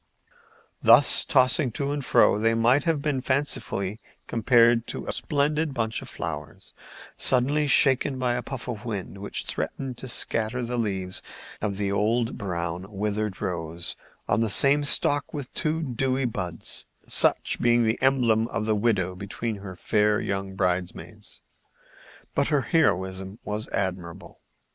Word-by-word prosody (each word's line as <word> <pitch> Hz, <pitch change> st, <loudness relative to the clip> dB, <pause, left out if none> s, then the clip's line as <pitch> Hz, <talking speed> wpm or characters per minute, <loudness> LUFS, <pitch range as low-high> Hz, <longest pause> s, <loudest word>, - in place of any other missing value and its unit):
Thus 120 Hz, +5 st, +8 dB
tossing 130 Hz, 0 st, +3 dB
to 140 Hz, +3 st, -2 dB
and 145 Hz, -1 st, -3 dB
fro, 115 Hz, -4 st, +4 dB
they 115 Hz, +1 st, +2 dB
might 120 Hz, +6 st, +3 dB
have 160 Hz, -4 st, 0 dB
been 145 Hz, -4 st, -1 dB
fancifully 125 Hz, -7 st, -2 dB, 0.3 s
compared 115 Hz, 0 st, +3 dB
to -, -, -5 dB
a -, -, -3 dB
splendid 150 Hz, 0 st, -1 dB
bunch 110 Hz, -2 st, -2 dB
of -, -, -9 dB
flowers -, -, -7 dB, 0.4 s
suddenly 140 Hz, +4 st, +2 dB
shaken 135 Hz, -1 st, +3 dB
by 125 Hz, -1 st, 0 dB
a 120 Hz, -, -2 dB
puff 130 Hz, -1 st, -7 dB
of 115 Hz, -3 st, -5 dB
wind 100 Hz, -4 st, -6 dB
which 100 Hz, -, -4 dB
threatened 130 Hz, -3 st, -5 dB
to 130 Hz, -, -6 dB
scatter 115 Hz, 0 st, 0 dB
the 120 Hz, +1 st, -3 dB
leaves 95 Hz, -4 st, -3 dB, 0.4 s
of 100 Hz, -2 st, -3 dB
an 100 Hz, -1 st, -1 dB
old 115 Hz, +4 st, 0 dB
brown, 90 Hz, -3 st, -4 dB
withered 105 Hz, 0 st, -3 dB
rose 85 Hz, -1 st, -3 dB, 0.3 s
on -, -, +1 dB
the 115 Hz, -, +1 dB
same 140 Hz, +7 st, +4 dB
stalk 145 Hz, +1 st, +2 dB
with 140 Hz, -4 st, -6 dB
two 160 Hz, +1 st, -2 dB
dewy 130 Hz, 0 st, -1 dB
buds, 90 Hz, -8 st, -4 dB, 0.2 s
such -, -, +2 dB
being 120 Hz, 0 st, +3 dB
the 110 Hz, 0 st, 0 dB
emblem 120 Hz, -4 st, +2 dB
of 110 Hz, -, -3 dB
the 110 Hz, -, +1 dB
widow 100 Hz, -4 st, 0 dB
between 105 Hz, +3 st, -5 dB
her 95 Hz, -2 st, -9 dB
fair 105 Hz, +3 st, +1 dB
young 95 Hz, -1 st, -4 dB
bridemaids. 90 Hz, -1 st, -4 dB, 0.9 s
But 140 Hz, -, +1 dB
her 145 Hz, -3 st, +1 dB
heroism 95 Hz, -, 0 dB
was 105 Hz, +1 st, -2 dB
admirable. 90 Hz, -3 st, -5 dB
115 Hz, 150 wpm, -25 LUFS, 100-130 Hz, 0.9 s, Thus